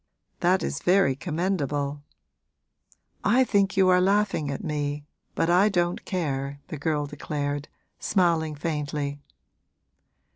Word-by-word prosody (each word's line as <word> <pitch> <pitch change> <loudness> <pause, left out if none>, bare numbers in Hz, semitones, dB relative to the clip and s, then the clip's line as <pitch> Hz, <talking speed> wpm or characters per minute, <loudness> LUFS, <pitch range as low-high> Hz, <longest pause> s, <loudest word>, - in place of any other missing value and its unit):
that 185 +2 +2
is 155 - -2
very 180 -6 +3
commendable.' 145 -3 -2 1.2
'I 260 +2 +4
think 200 -5 +1
you 190 -1 +5
are 180 0 +5
laughing 195 -6 +2
at 140 - -4
me, 145 -1 -2 0.3
but - - +1
I 180 +5 +5
don't 175 -3 0
care,' 140 -6 -2
the 160 - -5
girl 150 -1 0
declared, 145 0 -3 0.3
smiling 165 -5 +1
faintly. 145 -2 -3
155 Hz, 115 wpm, -26 LUFS, 145-185 Hz, 1.2 s, you